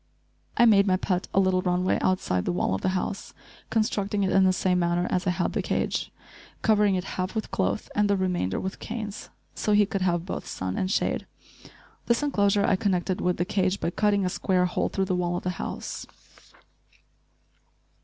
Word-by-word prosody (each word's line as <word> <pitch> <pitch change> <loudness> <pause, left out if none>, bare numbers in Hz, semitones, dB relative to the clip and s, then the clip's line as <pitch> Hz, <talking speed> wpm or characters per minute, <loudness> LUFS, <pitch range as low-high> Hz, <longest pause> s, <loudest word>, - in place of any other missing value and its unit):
I 235 - +6
made 205 -3 +5
my 185 -1 +3
pet 185 -1 -1
a - - +3
little 185 -1 +3
run 180 0 0
way - - +2
outside 90 - 0
the - - 0
wall 90 +1 0
of 95 - -2
the 185 0 0
house, 195 - -4 0.3
constructing 205 -2 0
it 190 - +1
in 195 -1 +5
the 185 - +5
same 185 -1 +1
manner 175 0 +1
as 180 +1 0
I - - +4
had 175 0 -1
the - - 0
cage, - - -1 0.5
covering 210 -2 +4
it 180 - -1
half 185 +2 -4
with 220 - -3
cloth - - -1
and 210 0 +2
the 200 - +3
remainder 180 - -1
with 190 +1 -5
canes 215 -2 -6 0.2
so 210 - 0
he 205 0 +5
could 195 -1 -3
have 175 -2 +1
both - - -5
sun 95 0 -4
and 185 - -1
shade. - - 0 0.8
This 235 +4 +2
enclosure 200 -7 +2
I 190 - +3
connected 185 -1 0
with 180 0 +1
the 175 - 0
cage 190 +1 0
by 170 - -1
cutting 205 0 +1
a - - +1
square 180 0 +1
hole 180 - -1
through 195 - -1
the 190 - -1
wall 175 0 -1
of - - -6
the 180 - -1
house. - - -5
185 Hz, 205 wpm, -26 LUFS, 180-205 Hz, 0.8 s, I